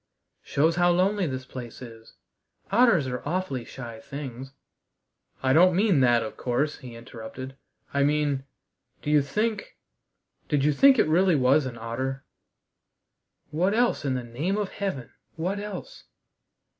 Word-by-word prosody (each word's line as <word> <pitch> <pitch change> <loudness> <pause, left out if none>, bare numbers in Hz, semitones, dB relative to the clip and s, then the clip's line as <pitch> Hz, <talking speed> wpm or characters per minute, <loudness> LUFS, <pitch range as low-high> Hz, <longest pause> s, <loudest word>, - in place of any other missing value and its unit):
"Shows 160 +4 +1
how 175 0 +4
lonely 185 +2 +2
this 130 -2 -4
place 125 -3 -8
is. 115 -3 -12 0.6
Otters 230 - +4
are 125 -1 -4
awfully 155 -6 -2
shy 115 -3 -9
things 135 -1 -7 0.5
" - - -37
"I 130 0 +3
don't 180 +3 +6
mean 195 -5 +3
that, 120 -2 +4
of 110 - -7
course," 135 +5 -1
he 125 -2 -10
interrupted. 120 +2 -9 0.4
"I 140 - +1
mean 145 -1 +1 0.6
do 150 - -1
you 150 -1 +5
think 210 +9 -2 0.7
did 145 -3 +2
you 150 - +4
think 270 - +6
it - - +4
really 175 +2 +4
was 135 +1 +3
an 120 -2 -7
otter?" 130 +4 -4 1.3
"What 185 +7 +1
else, 240 -7 +2
in 135 -2 0
the 125 - -3
name 145 - -2
of 205 -2 -1
Heaven, 190 - -4 0.2
what 185 +5 -2
else?" 210 - -8
145 Hz, 150 wpm, -26 LUFS, 130-185 Hz, 1.3 s, don't